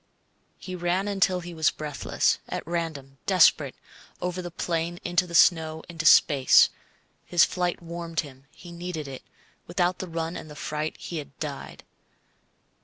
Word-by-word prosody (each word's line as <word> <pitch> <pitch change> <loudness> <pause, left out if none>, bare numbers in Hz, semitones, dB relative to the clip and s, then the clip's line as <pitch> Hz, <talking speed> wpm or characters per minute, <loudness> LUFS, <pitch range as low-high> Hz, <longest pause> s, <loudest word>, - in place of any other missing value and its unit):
He 185 - -7
ran 180 +3 0
until 190 -2 +1
he 175 0 -8
was 160 -2 +3
breathless, 150 -2 -1
at - - -4
random, 155 -5 -4
desperate, 160 -7 +4 0.4
over 180 0 -3
the 175 - -6
plain 170 0 -2
into 175 +1 +1
the 170 - -6
snow, 160 -2 +4
into 165 -2 -1
space. 140 -4 +6 0.5
His 175 -1 +4
flight 180 -1 -2
warmed 170 -1 -3
him. 135 -2 -13
He 175 - -13
needed 170 -3 -5
it. 135 -1 -8 0.5
Without 175 +1 0
the 185 - -4
run 165 0 -3
and 155 - -8
the 150 - -10
fright 150 +1 -4
he 170 - -6
had 140 -3 -8
died. 145 -3 -6
170 Hz, 155 wpm, -26 LUFS, 155-175 Hz, 0.5 s, space